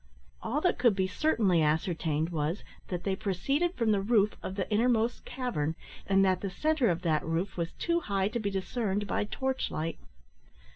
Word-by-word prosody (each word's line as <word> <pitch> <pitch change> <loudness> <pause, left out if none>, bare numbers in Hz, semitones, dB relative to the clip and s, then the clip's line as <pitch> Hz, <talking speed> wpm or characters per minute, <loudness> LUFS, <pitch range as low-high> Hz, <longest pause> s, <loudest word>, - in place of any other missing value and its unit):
All 255 +7 -1
that 360 - +1
could 240 -5 +4
be 190 -1 +1
certainly 190 - +2
ascertained 160 0 0
was, 160 +3 -2 0.2
that 180 -1 -4
they 195 -1 0
proceeded 275 - 0
from 230 -3 +2
the 200 -2 +2
roof 210 0 +3
of 190 - -5
the 195 - -2
innermost 230 +1 +2
cavern, 165 - -2 0.3
and 195 0 +4
that 185 -1 +2
the 195 - -2
centre 305 - +1
of 175 0 -1
that 155 -3 +1
roof 165 +4 -2
was 170 -1 -3
too 340 0 0
high 195 - 0
to 235 - -2
be 205 -2 -1
discerned 200 +1 -1
by 205 - -1
torch 265 +4 -2
light. 160 +1 -3
195 Hz, 185 wpm, -30 LUFS, 175-235 Hz, 0.3 s, could